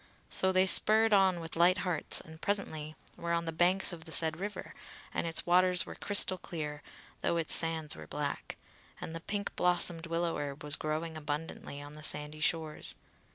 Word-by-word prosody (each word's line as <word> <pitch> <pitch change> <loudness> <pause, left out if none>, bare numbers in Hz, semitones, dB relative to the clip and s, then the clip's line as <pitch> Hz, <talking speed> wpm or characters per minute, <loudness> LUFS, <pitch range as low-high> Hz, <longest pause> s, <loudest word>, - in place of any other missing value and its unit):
So 190 - +2
they 185 0 +3
spurred 220 +3 +6
on 190 -3 +3
with 165 0 -5
light 175 +3 +4
hearts 175 -4 -1
and 160 0 -14
presently 155 -7 -3 0.2
were 170 0 -3
on 170 0 -1
the 165 - -3
banks 180 +3 +3
of 160 -1 -10
the 160 - -11
said 160 0 +3
river, 205 +2 -6 0.4
and - - -2
its 165 - +2
waters 180 0 +3
were - - -9
crystal 195 -2 +3
clear, 150 -3 -6 0.4
though 170 - 0
its 165 -1 +2
sands 160 -2 +2
were 80 -1 -11
black: - - -5 0.4
and 160 - -7
the 165 - -6
pink 200 +4 -5
blossomed 175 -2 +3
willow 170 0 -2
herb 145 0 -6
was 150 0 -1
growing 155 +2 -4
abundantly 150 -1 -6
on 145 +1 -11
the 155 - -10
sandy 150 0 -1
shores. 155 -1 0
165 Hz, 185 wpm, -31 LUFS, 155-180 Hz, 0.4 s, spurred